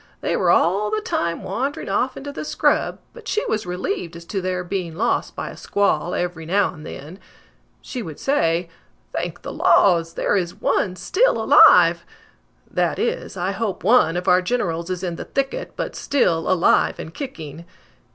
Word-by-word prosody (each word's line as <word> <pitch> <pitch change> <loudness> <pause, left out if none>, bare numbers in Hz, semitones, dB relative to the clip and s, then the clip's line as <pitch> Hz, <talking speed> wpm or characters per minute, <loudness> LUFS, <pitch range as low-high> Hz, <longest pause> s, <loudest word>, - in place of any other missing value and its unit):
They - - 0
were - - +1
all 195 +5 +3
the 215 0 0
time 170 -5 -2
wandering 280 +5 -3
off 255 +1 0
into 285 +1 -6
the 285 - -6
scrub, - - +1 0.2
but - - -12
she 435 +3 0
was 215 - -2
relieved 180 -1 -3
as 170 0 -10
to 195 +2 -3
their 185 0 -2
being 175 -3 -4
lost 225 +7 -1
by - - -5
a - - -11
squall 200 -3 0
every 175 -2 -3
now 190 +4 +1
and 155 -3 -12
then. 155 +8 -9 0.6
She 255 - -5
would 160 -8 -8
say: 175 - +1 0.5
'Thank - - -4
the - - -6
laws, 170 -3 +3
there - - +1
is 175 -3 -1
one 185 -3 0
still 410 - +1
alive!' - - +6 0.7
That - - 0
is, 475 - -2
I 180 +2 -1
hope 200 0 -3
one 190 -6 +4
of 180 - -4
our 180 0 +5
generals 180 -5 -2
is 185 0 -3
in 175 -2 -3
the - - -6
thicket, 275 0 -3
but - - -4
still 170 - +1
alive 185 -1 +3
and 160 - -8
kicking!" 165 - -7
185 Hz, 180 wpm, -22 LUFS, 170-225 Hz, 0.7 s, alive